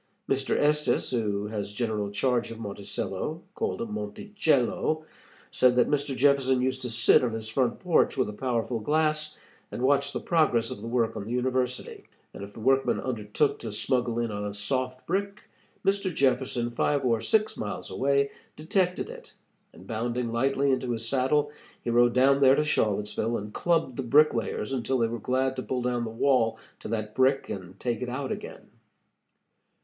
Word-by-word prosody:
Mr. 135 0 0
Estes, 150 0 +1
who 105 -4 -1
has 105 -1 -4
general 105 -2 -2
charge 120 +3 0
of 115 - -8
Monticello 100 - -4
called 115 - -2
Montechello 145 - 0 0.5
said 125 -1 +4
that 125 +3 +3
Mr. 140 -2 0
Jefferson 135 -1 +3
used 130 +1 -1
to 125 - -3
sit 115 +2 +4
on 120 -3 0
his 110 -1 -4
front 120 +1 0
porch 175 -5 +2
with 130 - +2
a 105 - -5
powerful 120 0 -1
glass, 155 +4 0 0.3
and 125 - -4
watch 140 +1 +3
the - - -3
progress 155 -9 +2
of 100 - -6
the 115 - -6
work 115 -1 0
on 100 - -5
the 115 - -6
University, 125 0 -2 0.3
and - - -8
if 100 +1 -9
the - - -11
workmen 135 +4 +2
undertook 120 +3 -1
to 115 - -5
smuggle 120 +2 0
in 120 -1 -1
a 105 0 -4
soft 130 +4 -2
brick, 200 +3 -2 0.4
Mr. 195 -1 +1
Jefferson, 125 -4 +1
five 140 +3 0
or 115 -3 +2
six 215 - +1
miles 100 -4 -5
away, 140 +7 +1 0.2
detected 180 +3 0
it, - - -10 0.4
and 90 - -15
bounding 120 +2 -2
lightly 135 +3 +1
into 130 -2 0
his 115 0 -3
saddle, 140 +4 +1 0.3
he 120 - -1
rode 120 0 +4
down 135 +2 +4
there 135 0 +7
to 150 - +1
Charlottesville, 105 -2 0
and 105 +1 -7
clubbed 165 -7 0
the - - -1
bricklayers 130 -3 +2
until 130 +1 0
they 115 -2 +2
were 115 +1 -4
glad 130 +3 0
to - - -1
pull 125 -1 -3
down 120 -1 0
the - - -4
wall 115 -1 +2 0.2
to - - -8
that 110 -2 -3
brick 135 +1 +2
and 95 0 -7
take 120 -3 -2
it 125 - -3
out 130 +2 -3
again. - - -7
125 Hz, 175 wpm, -27 LUFS, 115-140 Hz, 0.5 s, there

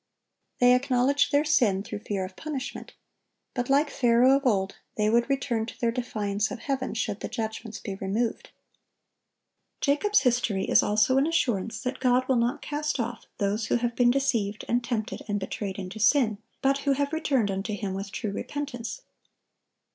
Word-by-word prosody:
They 245 0 +6
acknowledge 260 +2 +2
their 290 0 +2
sin, 210 -10 +3
through 205 - -6
fear 200 -3 -3
of 185 0 -11
punishment; 295 -4 -6 0.6
but, 245 0 -2
like 285 +2 +3
Pharaoh 245 +1 +4
of 275 -1 +1
old, 195 -4 +1 0.2
they 210 0 +2
would 235 +3 +2
return 245 -5 0
to - - -9
their 235 -1 +1
defiance 215 -4 -2
of - - -5
Heaven, 265 -3 -2
should 210 -2 -2
the - - -4
judgments 220 -1 -5
be 200 - -5
removed. 200 +4 -2 1.3
Jacob's 410 +9 +3
history 235 -6 +1
is - - +5
also 215 +6 +3
an 280 - +2
assurance 225 - 0
that 250 +1 -3
God 255 0 +2
will 260 - +3
not 240 +4 0
cast 300 -1 -2
off 235 0 -3
those 210 +2 0
who - - +2
have 240 0 -1
been 245 -1 +4
deceived, 235 -6 0
and 240 +1 +1
tempted, 230 -3 -3
and 205 -1 -1
betrayed 195 0 -4
into 195 +2 -6
sin, 220 -2 +3 0.2
but 275 +1 +3
who 280 0 +1
have 285 +2 -1
returned 270 -10 +1
unto 195 +2 -3
Him 200 -2 -4
with 195 +1 -5
true 210 - -3
repentance. 285 - -5
240 Hz, 175 wpm, -27 LUFS, 210-270 Hz, 1.3 s, They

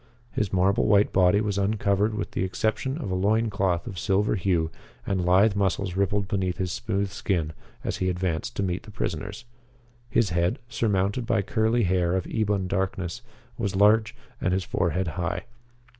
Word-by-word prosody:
His 100 -2 -1
marble 95 +1 +2
white 105 -1 +4
body 95 +2 +4
was 100 -2 -1
uncovered 100 +1 +1
with 105 - -3
the - - -1
exception 110 +8 -1
of 125 - -4
a - - 0
loin 110 +4 +2
cloth 95 -4 0
of 95 - -6
silver 100 +2 +1
hue, 85 -5 +1 0.3
and 95 -2 0
lithe 95 +4 +4
muscles 95 -2 0
rippled 100 +1 +1
beneath 95 -3 -1
his 90 -1 -2
smooth 100 -1 -2
skin 85 -6 -1 0.3
as - - -2
he 95 - 0
advanced 90 -3 -2
to 100 - -1
meet 90 -1 -1
the - - -14
prisoners. 105 +1 -4 0.6
His 105 -7 +2
head, 85 +1 +1
surmounted 105 0 0
by 100 - +2
curly 110 +4 +1
hair 90 -1 +2
of 95 - -1
ebon 105 -4 0
darkness, 95 +2 -2 0.4
was 100 -4 -1
large, 110 +3 +4 0.3
and 90 - +1
his 95 0 +1
forehead 85 +1 0
high. 85 +5 -3
95 Hz, 175 wpm, -26 LUFS, 90-105 Hz, 0.6 s, white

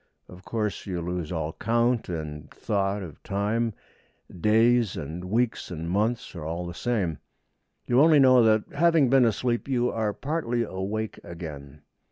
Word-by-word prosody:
Of 90 +1 -13
course, 105 -1 -3
you 90 -3 -2
lose 85 -1 -4
all 80 -2 -2
count 115 +1 +1
and 75 -3 -5
thought 100 -1 -1
of 80 -6 -10
time; 105 +3 -1 0.6
days 110 +3 +3
and 80 +4 -6
weeks 115 +5 0
and 85 -2 -5
months 110 +6 -1
are 85 - -6
all 85 +3 -4
the 85 - -6
same. 95 -7 -1 0.7
You 125 +2 +4
only 155 0 +6
know 130 -3 +7
that, 110 -2 +4
having 160 -4 +3
been 135 -2 +6
asleep, 120 +3 0
you 125 -2 +1
are 110 -2 -1
partly 120 -2 -2
awake 105 +2 -4
again. 75 -4 -9
105 Hz, 155 wpm, -26 LUFS, 85-120 Hz, 0.7 s, know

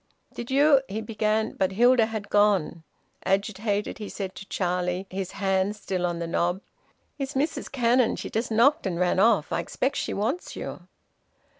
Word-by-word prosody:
"Did 240 - -7
you 280 +1 +5
" - - -30
he 205 +3 -3
began. 220 0 0
But 190 0 -1
Hilda 240 +1 +5
had 220 -2 -5
gone. 205 -6 +2 0.4
Agitated, 205 +2 -1
he 210 - -6
said 190 -2 -5
to 195 - -10
Charlie, 180 0 -1
his 190 -1 -4
hand 195 0 0
still 185 -3 -2
on 175 -1 -3
the 170 - -3
knob: 175 +2 0 0.6
"It's 275 0 -4
Mrs 295 +4 -1
Cannon. 245 -2 +2
She - - -6
just 225 +2 -1
knocked 250 +4 +4
and 175 -2 -2
ran 180 +1 +2
off. 205 -6 +3
I - - 0
expect 255 +10 -2
she - - -2
wants 235 - -2
you." - - -7
205 Hz, 175 wpm, -26 LUFS, 190-235 Hz, 0.6 s, you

